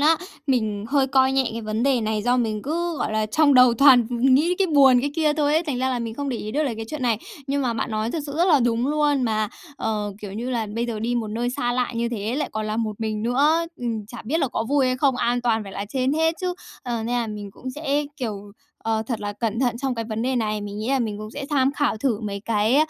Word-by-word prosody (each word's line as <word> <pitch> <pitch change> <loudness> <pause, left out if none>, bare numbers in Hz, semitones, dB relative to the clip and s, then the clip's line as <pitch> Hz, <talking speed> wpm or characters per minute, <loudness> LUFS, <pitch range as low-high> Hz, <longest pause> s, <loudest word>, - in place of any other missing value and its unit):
á. 315 +3 +5 0.3
Mình 215 -6 0
hơi 275 0 +3
coi 265 0 +3
nhẹ 270 -2 +2
cái 230 - -4
vấn 215 +1 -2
đề 270 -3 +3
này 215 -1 -1
do 245 +2 +2
mình 220 -3 -1
cứ, 335 +3 -2
gọi - - -1
là, 215 0 +1
trong 285 +6 +3
đầu 250 -2 +7
toàn 255 -2 +6
nghĩ 265 +8 +3
cái 390 - +3
buồn, 275 -6 +6
cái 285 +3 -1
kia 310 -2 +2
thôi 295 -1 +1
ấy, 320 - +3
thành 290 -7 -3
ra 260 +1 +1
là 250 - -1
mình 230 -1 -4
không 285 +3 -3
để 250 - -1
ý 215 - -5
được 300 +6 0
là 260 -6 -1
cái 225 0 -5
chuyện 305 0 -5
này. 235 -4 +2 0.3
Nhưng 280 0 0
mà 240 -2 0
bạn 230 - -2
nói 215 +1 -1
thực 320 - -2
sự 285 - -6
rất 345 - +4
là 295 -5 +5
đúng 235 +1 +1
luôn 295 -2 +2
mà, 215 -2 0 0.3
ờ, 210 -4 -2
kiểu 195 -2 -6
như 235 +5 -4
là, 230 -3 -1
bây 235 +1 -1
giờ 225 -2 -3
đi 235 +3 -1
một 230 -3 -1
nơi 235 +3 -2
xa 245 -1 -1
lạ 250 0 0
như 235 0 0
thế 230 +2 -3
lại 300 - -1
còn 215 0 -2
là 215 0 -2
một 220 -2 -3
mình 215 -1 -2
nữa, 295 +8 +2
ừm, 225 -4 -3
chả 235 +3 -9
biết 300 +8 0
là 275 - +1
có 225 - -2
vui 280 -2 +3
hay 255 0 +1
không, 270 -2 +2
an 245 +1 +1
toàn 225 -2 +1
phải 195 -1 -9
là 200 - -4
trên 260 +2 0
hết 320 +1 +2
chứ. 365 -1 -1 0.3
Ờ, 240 -2 -2
nên 235 +2 -2
là 235 -1 0
mình 210 -2 -6
cũng 255 +5 -7
sẽ, 295 +1 -1
kiểu, 205 -6 -5 0.3
ờ, 220 -1 -1
thật 235 -3 -3
là 205 0 -3
cẩn 225 +2 -2
thận 245 -2 +1
trong 265 -1 -1
cái 230 - -3
vấn 220 0 -3
đề 260 0 0
này. 215 -2 -1
Mình 205 0 -6
nghĩ 215 +3 -3
là 270 0 +2
mình 215 -4 -2
cũng 215 0 -7
sẽ 280 +3 -6
tham 275 -1 +2
khảo 290 -6 0
thử 230 -2 0
mấy 200 -2 -4
cái, 220 +3 +2
245 Hz, 285 wpm, -23 LUFS, 220-275 Hz, 0.3 s, đầu